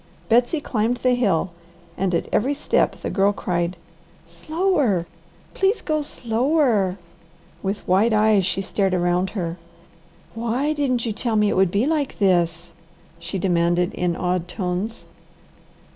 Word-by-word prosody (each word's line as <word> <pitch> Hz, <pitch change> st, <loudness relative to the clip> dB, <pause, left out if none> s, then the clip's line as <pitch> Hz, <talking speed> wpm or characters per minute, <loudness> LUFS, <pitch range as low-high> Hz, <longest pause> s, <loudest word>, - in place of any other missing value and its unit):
Betsy 245 Hz, +7 st, +3 dB
climbed 235 Hz, -3 st, -1 dB
the 250 Hz, 0 st, +2 dB
hill 190 Hz, -8 st, +1 dB, 0.4 s
and 185 Hz, -2 st, 0 dB
at -, -, -1 dB
every 275 Hz, +6 st, +1 dB
step 295 Hz, -, +1 dB
the -, -, -5 dB
Girl 195 Hz, 0 st, +3 dB
cried, 175 Hz, -2 st, -2 dB, 0.5 s
"Slower! 260 Hz, -, 0 dB, 0.5 s
please 390 Hz, +4 st, +1 dB
go 310 Hz, -2 st, 0 dB
slower!" 235 Hz, -, +1 dB, 0.6 s
With 200 Hz, +1 st, -4 dB
wide 195 Hz, +6 st, +3 dB
eyes 215 Hz, -2 st, +4 dB
she 185 Hz, +1 st, 0 dB
stared 195 Hz, -1 st, 0 dB
around 175 Hz, +1 st, +1 dB
her. 170 Hz, -2 st, -3 dB, 0.8 s
"WHY 235 Hz, +6 st, -1 dB
DIDN'T 255 Hz, -5 st, 0 dB
YOU 225 Hz, -, -1 dB
TELL 225 Hz, +1 st, -2 dB
ME 210 Hz, -1 st, +3 dB
IT -, -, -1 dB
WOULD 190 Hz, -1 st, +3 dB
BE 205 Hz, +6 st, +1 dB
LIKE 300 Hz, -2 st, -1 dB
THIS?" 175 Hz, -3 st, +1 dB, 0.5 s
she 195 Hz, -, -5 dB
demanded 175 Hz, -1 st, +1 dB
in 175 Hz, -1 st, -1 dB
awed 180 Hz, 0 st, -1 dB
tones. 185 Hz, +4 st, -3 dB
200 Hz, 140 wpm, -22 LUFS, 180-245 Hz, 0.8 s, eyes